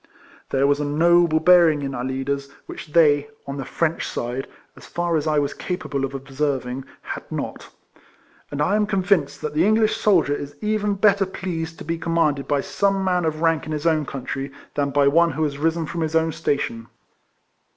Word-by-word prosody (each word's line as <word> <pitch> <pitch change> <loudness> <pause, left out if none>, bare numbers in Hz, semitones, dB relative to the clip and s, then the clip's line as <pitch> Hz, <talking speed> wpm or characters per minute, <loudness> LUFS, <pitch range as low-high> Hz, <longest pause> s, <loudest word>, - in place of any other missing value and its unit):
There 135 0 +2
was 145 +1 +2
a - - -1
noble 165 +2 +3
bearing 165 -3 +5
in 135 -1 -3
our 120 - -4
leaders, 135 +2 -3 0.2
which - - -8
they, 145 -3 +4 0.2
on 140 0 -5
the 135 - -4
French 165 -1 -1
side 125 +3 -4 0.3
(as - - -14
far 175 -1 -1
as 155 -1 0
T 155 -1 +1
was 145 -1 0
capable 150 -6 -3
of 135 0 -7
observing) 135 -1 -3 0.2
had - - -7
not; - - -5 0.8
and 145 +1 -1
I 195 +7 +2
am 210 -1 +2
convinced 185 -8 +1
that 150 -1 -3
the 155 +2 +2
English 215 +2 +3
soldier 180 -8 +3
is 145 0 -5
even 210 -1 0
better 200 -1 +3
pleased 165 -4 -5
to - - -9
be 165 +1 -2
commanded 155 -5 0
by 145 -1 +1
some 195 +3 0
man 180 -2 +1
of 155 0 -2
rank 165 -2 +1
in - - -5
his 150 +1 -4
own 155 -3 +2
country, 135 +1 -5 0.2
than 140 -1 0
by 140 0 +3
one 170 +4 +4
who 160 +1 -2
has 140 -2 -2
risen 165 +1 0
from 170 +2 -4
his 160 0 -1
own 160 0 +2
station. 115 -6 -2
155 Hz, 195 wpm, -22 LUFS, 140-170 Hz, 0.8 s, bearing